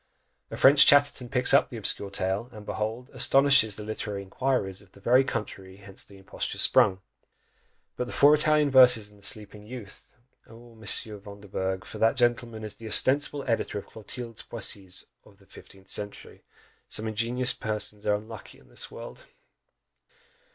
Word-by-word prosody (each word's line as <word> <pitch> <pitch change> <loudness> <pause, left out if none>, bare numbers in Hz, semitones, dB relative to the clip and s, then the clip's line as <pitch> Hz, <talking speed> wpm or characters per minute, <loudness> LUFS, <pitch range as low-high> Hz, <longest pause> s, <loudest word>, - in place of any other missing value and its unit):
A - - -7
French 140 +1 +7
Chatterton 145 -3 +4
picks 125 +1 +2
up 140 - +4
the 120 - -8
obscure 100 -1 +2
tale, 95 +4 -2
and 105 -2 -12
behold, 110 +5 -4
astonishes 130 -4 +4
the 105 - -8
literary 105 -2 -5
inquirers 100 -2 -2
of 100 -2 -22
the - - -17
very 125 +6 +4
country 95 -6 -6
whence 95 -1 -7
the 100 - -16
imposture 95 - -5
sprung! 105 -7 +3 1.0
But 125 - -3
the - - -8
FOUR 145 +1 +5
Italian 150 -1 +3
verses, 125 -5 +6
and 105 - -20
the - - -15
Sleeping 105 0 -3
Youth! 110 -5 -11 0.3
Oh! 115 +1 -15
Monsieur 110 -1 -1
Vanderbourg! 100 -2 -5
for - - -9
that 115 +4 +3
gentleman 120 -2 0
is 105 -1 -6
the 115 - -9
ostensible 140 +6 +2
editor 115 -3 -1
of 100 - -7
Clotilde's 115 +1 -8
poesies 95 -4 -4 0.2
of - - -21
the - - -23
fifteenth 95 0 -16
century, 100 -1 -6 0.4
some 110 - -3
ingenious 120 +3 +1
persons 105 -1 -5
are 105 - +3
unlucky 110 +2 -10
in - - -22
this - - -3
world! - - -11
110 Hz, 165 wpm, -26 LUFS, 100-125 Hz, 1.0 s, French